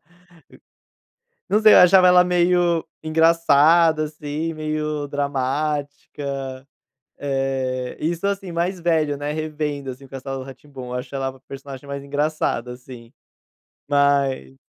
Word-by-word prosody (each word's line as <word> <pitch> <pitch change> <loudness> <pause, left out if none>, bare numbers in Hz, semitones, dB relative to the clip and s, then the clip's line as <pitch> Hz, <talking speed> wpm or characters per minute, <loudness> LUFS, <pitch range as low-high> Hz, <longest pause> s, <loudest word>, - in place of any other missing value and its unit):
e, 175 +3 -29 1.4
não 210 - +5
sei, 215 -1 +8
achava 185 +1 +7
ela 180 0 +6
meio 175 -1 +2 0.2
engraçada, 160 0 +4
assim, 150 +1 -4
meio 155 -1 -3
dramática, 140 -1 -3 0.5
eh, 135 -2 -2
isso, 170 +4 -2
assim, 195 -2 -3
mais 175 +3 -1
velho, 160 -4 +1
né, 145 +1 -4
revendo, 150 -3 -4
assim, 130 +2 -11
o - - -15
Castelo 135 0 -6
Rá-Tim-Bum, 135 0 -11
eu 125 - -6
acho 125 +3 -6
ela 135 -1 -1
a 135 0 -10
personagem 135 0 -9
mais 140 0 -6
engraçada, 145 -4 -1
assim, 125 -2 -12 0.8
mas 140 - +1
145 Hz, 120 wpm, -22 LUFS, 135-160 Hz, 1.4 s, sei